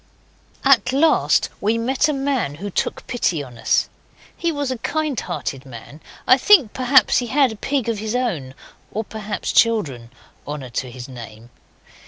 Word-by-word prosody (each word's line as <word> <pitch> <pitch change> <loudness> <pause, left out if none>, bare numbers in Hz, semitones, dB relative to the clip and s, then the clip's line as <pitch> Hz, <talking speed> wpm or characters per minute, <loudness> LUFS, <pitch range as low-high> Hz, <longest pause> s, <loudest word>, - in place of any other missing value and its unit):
At 255 -3 +5
last 310 +4 +3
we 220 +3 +1
met 260 +5 +1
a - - +2
man 270 - -1
who 200 +6 -6
took - - -2
pity 175 -11 -1
on 120 -3 -12
us. - - +2 0.5
He 340 - -1
was 285 -3 -2
a 255 - -4
kind 310 -1 -1
hearted 140 -6 -5
man. 135 +4 -12 0.3
I 255 - +6
think, 315 - +5
perhaps, 260 +1 +4
he 245 - -3
had 265 0 +3
a - - -7
pig 270 +2 -2
of 225 -3 -1
his 220 +2 -3
own 170 - -2 0.4
or, 220 - -2
perhaps, 215 -1 -4
children. 155 - +2 0.4
Honour 145 -4 -6
to 125 +2 -3
his 125 0 -9
name! 120 -2 -11
220 Hz, 170 wpm, -21 LUFS, -, 0.5 s, I